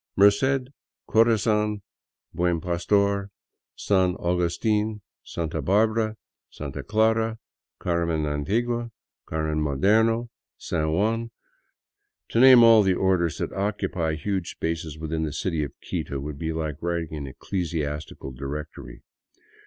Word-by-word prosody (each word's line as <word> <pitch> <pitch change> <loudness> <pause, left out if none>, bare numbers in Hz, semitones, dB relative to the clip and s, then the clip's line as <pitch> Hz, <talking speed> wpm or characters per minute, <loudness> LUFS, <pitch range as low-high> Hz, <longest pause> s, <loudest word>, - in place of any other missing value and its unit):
Merced, 125 +7 +3 0.4
Corazon, 105 -2 +2 0.5
Buen 90 -1 +1
Pastor, 100 +3 +1 0.5
San 95 -3 +2
Augustin, 105 +5 0 0.2
Santa 80 -3 -4
Barbara, 110 +2 +1 0.3
Santa 70 -3 -6
Clara, 110 +1 +1 0.4
Carmen 85 -3 0
Antigua, 115 +12 -1 0.4
Carmen 80 -1 -1
Moderno, 110 - +2 0.3
San 80 -2 -2
Juan... 115 +6 0 1.0
to 115 - +1
name 130 -1 +9
all 115 -1 +8
the 95 -2 +2
orders, 90 -4 +1
that - - -3
occupy 95 -5 -1
huge 95 +3 -2
spaces 80 -2 -4
within 80 0 -3
the 80 -2 -2
city 80 0 -1
of 70 - -5
Quito 70 - -4
would 70 +1 -6
be 80 -1 -2
like 80 -2 -4
writing 85 -2 -2
an 70 -2 -5
ecclesiastical 75 -2 -4
directory. 70 +4 -7
90 Hz, 115 wpm, -25 LUFS, 80-110 Hz, 1.0 s, name